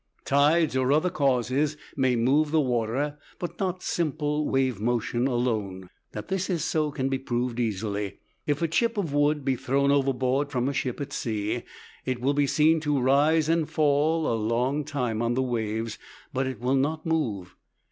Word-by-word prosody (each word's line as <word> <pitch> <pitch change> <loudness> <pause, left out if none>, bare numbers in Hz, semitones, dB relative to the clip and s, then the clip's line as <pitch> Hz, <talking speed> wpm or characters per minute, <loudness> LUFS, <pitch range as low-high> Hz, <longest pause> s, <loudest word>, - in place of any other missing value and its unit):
Tides 150 +2 +3
or 130 0 +2
other 155 +5 +2
causes 140 -1 +1 0.2
may 130 -3 +2
move 135 +6 +2
the 160 +1 +2
water, 130 +3 -1 0.2
but 175 - -6
not 185 -2 -2
simple 150 -2 -1
wave 130 -6 0
motion 120 +2 0
alone. 110 -8 -2 0.2
That 105 0 -6
this 190 0 -2
is 175 -4 0
so 155 -1 0
can 135 -2 -2
be 135 -1 -1
proved 120 -2 -2
easily. 105 -3 -2 0.3
If 145 +2 0
a - - +3
chip 225 +9 +1
of 170 -8 -1
wood 145 -1 +2
be 135 -1 +2
thrown 140 +3 +1
overboard 135 0 +1
from 125 -2 -1
a 140 - -1
ship 130 -1 -2
at 145 0 -5
sea 110 +1 -2 0.4
it 130 -2 -2
will 135 +3 +1
be 145 0 +2
seen 160 +3 +3
to 150 -2 0
rise 145 +5 +3
and 165 -1 +1
fall 155 +1 +2
a - - +1
long 120 +6 0
time 125 -7 -2
on 120 0 0
the 130 - +1
waves, 110 -2 -2 0.3
but 130 0 0
it 130 - -5
will 125 +2 0
not 155 +5 0
move. 110 - -2
135 Hz, 180 wpm, -26 LUFS, 120-150 Hz, 0.4 s, Tides